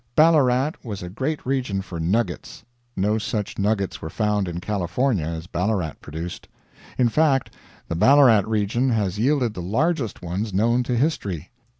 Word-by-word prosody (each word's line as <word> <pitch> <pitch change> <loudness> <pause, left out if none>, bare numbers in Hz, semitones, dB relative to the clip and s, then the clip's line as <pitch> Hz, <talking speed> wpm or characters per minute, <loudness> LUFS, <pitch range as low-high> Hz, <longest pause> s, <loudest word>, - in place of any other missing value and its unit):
Ballarat 150 -4 +4
was 105 -6 -6
a 90 - -7
great 135 +9 -3
region 125 -7 -1
for 85 -3 -7
"nuggets." 100 +9 -2 0.3
No 105 +3 +1
such 105 -1 -3
nuggets 100 -1 0
were 80 - -5
found 105 +1 0
in 85 0 -4
California 100 - 0
as 80 0 -5
Ballarat 90 -3 -1
produced. 80 +4 -7 0.5
In 125 - +4
fact, 135 +1 +2 0.3
the - - -3
Ballarat 125 - +6
region 110 +4 +1
has 105 -4 0
yielded 125 -2 +2
the 90 - -6
largest 120 - -1
ones 95 +4 -3
known 115 +5 +3
to 125 - -1
history. 100 - -1
105 Hz, 155 wpm, -23 LUFS, 95-130 Hz, 0.5 s, Ballarat